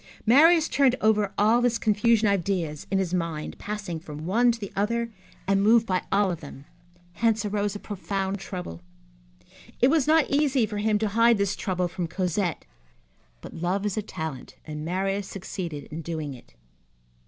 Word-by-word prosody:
Marius 315 +7 +6
turned 265 -3 +3
over 210 -2 +2
all 220 +4 +4
this 240 -1 +2
confusion 220 0 +2
of 200 - +4
ideas 175 -6 -2
in 195 - +1
his 185 -2 -1
mind, 165 -4 -3
passing 205 -6 -5
from 155 -1 -8
one 235 +7 +3
to 230 - -5
the 200 -3 -7
other, 230 +3 -1 0.4
and 195 0 +3
moved 225 +2 +5
by 185 -4 0
all 195 -1 +3
of 170 - -4
them. 140 -2 -11 0.5
Hence 225 +3 +1
arose 205 0 -1
a - - -5
profound 195 -1 -3
trouble. 180 - -7 1.0
It 250 - +5
was 310 -4 +2
not 315 -2 +4
easy 280 -4 +2
for 210 -1 -5
him 210 0 +2
to 215 0 -1
hide 230 +2 +4
this 200 -1 0
trouble 180 -2 -1
from 175 0 -4
Cosette, 180 0 -2 0.8
but - - -10
love 180 +4 -1
is 205 - -1
a 215 - -1
talent, 160 -9 -7
and 150 -1 -6
Marius 195 +3 -1
succeeded 175 -6 -6
in 160 +2 -5
doing 155 -3 -4
it. 120 - -16
200 Hz, 175 wpm, -26 LUFS, 175-225 Hz, 1.0 s, Marius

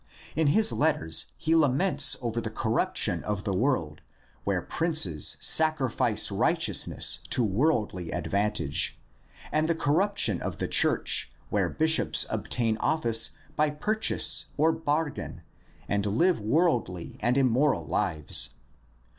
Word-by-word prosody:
In 160 -1 +1
his 215 +9 +3
letters 80 - +1
he 160 - -1
laments 160 +4 +3
over 115 0 -3
the 115 - -5
corruption 110 +1 -1
of 105 -2 -4
the 100 - -3
world 95 - -2 0.4
where - - -1
princes 155 - 0
sacrifice 155 -5 +2
righteousness - - +2
to 125 - +2
worldly 105 - -1
advantage, 100 -6 -1 0.5
and 155 +1 0
the 165 - +1
cor 145 -3 -1
ruption 200 +5 +1
of - - -5
the - - -3
church - - +1 0.2
where - - 0
bishops 160 0 +2
obtain 115 -3 -1
office 115 -8 +2 0.2
by 150 0 +1
purchase 210 +9 +1
or 160 +2 +3
bargain 160 -1 -4 0.4
and 100 0 -1
live 165 - +1
worldly 110 - -1
and 125 +2 0
immoral 130 - +1
lives. 75 -2 -1
130 Hz, 120 wpm, -26 LUFS, 105-160 Hz, 0.5 s, his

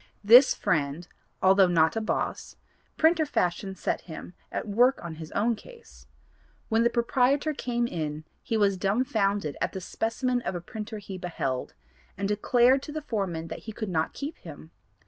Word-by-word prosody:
This 245 +6 +8
friend, 155 +2 -1 0.4
although 190 0 +6
not 165 0 +3
a 225 - 0
'boss,' 215 - -3 0.4
printer 320 0 +4
fashion 190 - -1
set - - -2
him 170 +1 -9 0.2
at - - -4
work 245 +6 +3
on 170 - -5
his 160 -1 -9
own 230 +2 +1
case. 60 - -16 0.6
When 225 +1 +3
the 235 - +4
proprietor 255 +5 +1
came 240 -3 -1
in 155 -7 -4 0.2
he 225 - -1
was 200 -2 +2
dumbfounded 200 - 0
at - - -1
the 190 - -4
specimen 245 +6 -1
of 190 - -3
a - - -2
printer 215 +4 -7
he 195 -2 -8
beheld, 135 -8 -3 0.4
and 200 - -1
declared 245 +5 +3
to 295 - -8
the 310 0 -5
foreman 180 -7 -3
that 160 - -6
he - - -3
could 215 -1 -5
not 160 -3 -1
keep 290 +3 -6
him. 160 0 -11
205 Hz, 170 wpm, -27 LUFS, 175-240 Hz, 0.6 s, This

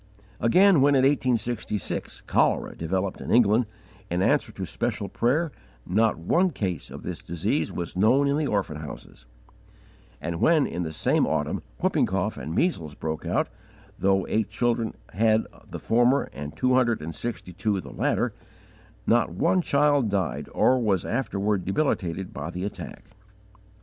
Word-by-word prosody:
Again, 180 +6 +5
when, 140 +1 +5
in 130 - +4
1866, 120 -7 -1
cholera - - +1
developed 95 +4 -2
in - - -6
England, 115 0 +4 0.4
in 90 +2 0
answer - - +2
to - - -5
special - - -2
prayer 150 +7 +1 0.3
not 110 +4 +2
one 170 - +2
case 95 - -3
of - - -9
this - - -5
disease 85 -1 -1
was 85 -1 -5
known 120 +9 +4
in 140 - +2
the 150 -1 0
orphan 100 - -1
houses; 75 -5 -10 0.9
and 85 +1 -4
when, 160 -4 +4
in 85 - -3
the 80 -2 -3
same 80 - +1
autumn, - - -1 0.2
whooping - - +2
cough - - -1
and 80 - -5
measles 85 - 0
broke 80 -1 -4
out, - - +1 0.5
though 95 0 +2
eight 110 -1 0
children 115 -2 0 0.2
had 110 +3 +3 0.2
the - - -5
former 120 +4 +2
and 75 +1 -7
two 130 0 +2
hundred 120 -3 +3
and 80 +2 -5
sixty 110 -2 -5
two, 100 +2 0
the - - -9
latter, - - 0 0.7
not 115 -2 +3
one 95 - +2
child 145 -6 +2
died, 95 -5 -2
or 130 0 +3
was 100 -6 +1
afterward 105 -5 -1
debilitated 95 - -1
by - - -5
the 90 - -5
attack. 100 +1 -6
110 Hz, 155 wpm, -26 LUFS, 90-130 Hz, 0.9 s, Again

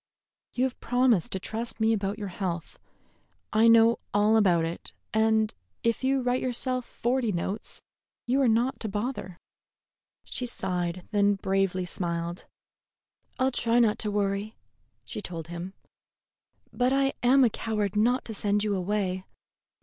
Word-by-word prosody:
"You 255 - +1
have 260 -1 -1
promised 245 -8 +2
to 190 - -2
trust 225 +4 -5
me 220 +1 +3
about 200 -1 -1
your 205 -3 -5
health. 175 -3 -4 0.7
I 220 +2 +5
know 230 0 +6 0.2
all 210 +2 +4
about 180 -6 +4
it, 165 +1 -6 0.2
and 220 0 +3 0.3
if 230 +2 0
you 265 0 +2
write 250 +1 +1
yourself 255 0 -1
forty 240 -1 -1
notes, 195 +4 -4 0.4
you 260 +3 +2
are 265 - +4
not 235 +4 +2
to 220 - -3
bother." 205 -4 -4 0.9
She 250 - -3
sighed, 180 -6 -2
and - - -26
then 205 -1 +3
bravely 195 -1 0
smiled. 170 -1 -3 0.9
"I'll 260 +1 +2
try 235 -1 +1
not 225 -3 +3
to 215 - -1
worry," 205 +1 -1 0.5
she - - -6
told 165 -4 -7
him; 175 +3 -6 1.0
"but 250 +1 +2
I 275 0 +2
am 260 +2 +5
a 240 - +5
coward 210 -3 -2
not 240 +5 +2
to 225 - -5
send 205 0 0
you 210 -2 0
away. 190 -1 -1
215 Hz, 150 wpm, -27 LUFS, 190-240 Hz, 1.0 s, know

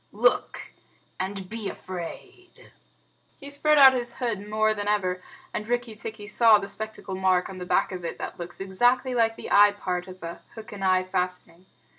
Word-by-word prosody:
Look, - - 0 0.5
and 190 0 -4
be 220 0 -5
afraid!" 185 - -9 0.7
He 280 0 -9
spread 300 +1 +3
out 270 -2 +9
his 240 -2 -2
hood 235 -6 -2
more 215 0 +2
than 205 -1 -4
ever, 185 -3 0 0.3
and 210 - -4
Rikki 240 -1 -1
tikki 215 -1 -7
saw 220 +1 +5
the 195 -1 -5
spectacle 215 -2 -6
mark 185 -1 +1
on 185 - -9
the 180 - -6
back - - +2
of 180 -2 -6
it 170 - -4
that - - -7
looks 175 0 -7
exactly 245 +7 +1
like 225 -2 +2
the - - -8
eye 205 0 +7
part 180 -3 -3
of 185 -1 -11
a 170 0 -7
hook 225 -1 -10
and 200 -2 -7
eye 185 -1 +3
fastening. 180 -1 -4
205 Hz, 185 wpm, -26 LUFS, 185-230 Hz, 0.7 s, out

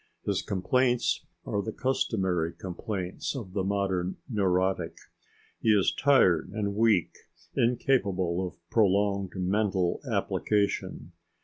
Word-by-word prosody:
His - - 0
complaints 120 +6 +1 0.2
are 100 - -1
the 110 - -4
customary 95 -10 0
complaints 95 +4 -4
of 105 -9 -6
the 95 -2 0
modern 95 -2 -1
neurotic. 95 -5 0 0.6
He 110 - 0
is 95 - +2
tired 95 - +4
and 100 -2 -1
weak, 105 -5 +3 0.4
incapable 100 -8 +1
of - - -11
prolonged 100 -2 +2
mental 95 -1 0
application. 100 -6 -1
100 Hz, 105 wpm, -28 LUFS, 90-110 Hz, 0.6 s, tired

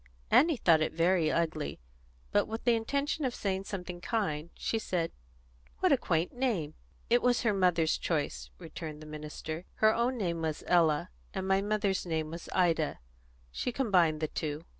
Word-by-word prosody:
Annie 320 -1 +5
thought 165 -7 +4
it 155 - 0
very 170 -1 +3
ugly, 155 - -1 0.5
but, - - +2
with 225 +1 -5
the 240 - +4
intention 280 +7 -1
of 255 -2 -1
saying 190 -1 -2
something 180 -3 -6
kind, 170 -7 -1
she 225 - -1
said, 175 -6 -1 0.7
"What - - +2
a - - +7
quaint 165 +2 0
name!" 220 - -1 0.4
"It 240 0 +5
was 245 0 +2
her 220 -3 +3
mother's 175 -4 +2
choice," 150 -4 -2
returned 160 -3 -8
the - - -10
minister. 155 +2 -6
"Her 215 0 +4
own 240 +3 0
name 170 -6 -1
was 155 -2 -2
Ella, 160 - +3 0.2
and 190 - -2
my 195 0 +3
mother's 205 -2 0
name 160 -3 -2
was 170 +1 -8
Ida; 165 -4 +2 0.5
she 250 - -2
combined 180 - +2
the 155 - +1
two." 155 +1 -4
175 Hz, 170 wpm, -31 LUFS, 160-215 Hz, 0.7 s, a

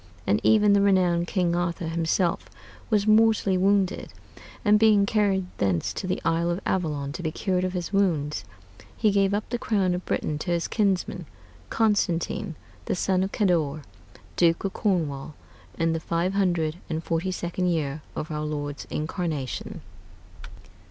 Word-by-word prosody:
And 100 - +2
even 210 -2 +5
the 200 - +4
renowned 180 -3 +3
King 175 -2 +1
Arthur 170 -1 -2
himself 165 +1 0 0.4
was 210 -3 +2
mortally 215 -2 +4
wounded; 195 +1 +1 0.5
and 210 0 +5
being 210 -2 +5
carried 200 -3 +1
thence 95 -4 0
to 185 - -4
the 185 - -1
isle 170 +1 +1
of 175 +1 -1
Avallon 150 -6 -1
to 165 - -6
be 160 -2 -2
cured 185 +1 -1
of 185 0 -1
his 180 +1 -4
wounds, 155 - +1 0.5
he 215 -2 +3
gave 195 -1 +2
up 205 +1 -1
the 240 - -1
crown 195 -6 +1
of 180 +1 -3
Britain 150 -1 -2
to 175 - -5
his 170 -1 0
kinsman 190 -5 0 0.4
Constantine, 190 -6 0 0.3
the - - -1
son 185 0 +1
of 190 +1 -1
Cador, 160 -7 +1 0.5
Duke 165 -1 +3
of 195 - -2
Cornwall, 155 -8 -1 0.4
in 165 0 +1
the 165 - -1
five 170 +3 -1
hundred 175 -5 +1
and 160 0 -3
forty 170 +3 -1
second 180 0 -2
year 155 -4 -1
of 155 - -4
our 150 0 -2
Lord's 145 -2 -4
incarnation. 155 - -3
180 Hz, 160 wpm, -25 LUFS, 160-195 Hz, 0.5 s, even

